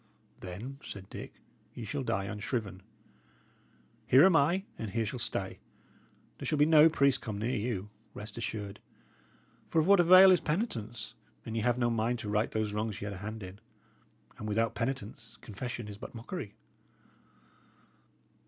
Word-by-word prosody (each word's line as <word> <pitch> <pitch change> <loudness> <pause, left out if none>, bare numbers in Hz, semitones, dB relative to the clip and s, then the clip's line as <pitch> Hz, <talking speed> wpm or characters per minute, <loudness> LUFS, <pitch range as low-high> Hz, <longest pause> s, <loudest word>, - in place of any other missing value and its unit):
"Then," 110 +10 -7
said 95 -1 -9
Dick, - - -7 0.4
"ye - - -6
shall - - -3
die 95 - -1
unshriven. 105 -2 -4 1.3
Here 135 +6 +7
am 190 -3 +5
I, 170 +6 +3 0.2
and 110 - -3
here 115 +2 -1
shall 120 +4 -4
stay. - - -3 0.8
There - - -4
shall 155 - +1
no 155 +1 +7
priest 140 -4 +2
come 110 -3 -4
near 115 +5 -1
you, 105 -3 -3 0.2
rest 105 0 -8
assured. 105 -4 -5 0.9
For - - -3
of 155 - +3
what 200 +1 +6
avail 185 +2 +9
is 180 - +4
penitence, 120 - -3 0.3
an 110 - -5
ye 115 - -1
have 120 +2 +2
no 120 -1 +1
mind 115 +2 0
to 110 -2 -5
right 105 +1 +1
those 110 -1 -2
wrongs 105 -1 -2
ye - - -5
had 105 - -4
a - - -7
hand 105 +2 -6
in? 95 +2 -9 0.8
and 105 - -5
without 110 +2 +1
penitence, 115 -3 -4
confession 120 +1 -6
is 105 0 -9
but 125 - -9
mockery." 115 - -6
115 Hz, 160 wpm, -31 LUFS, 105-135 Hz, 1.3 s, avail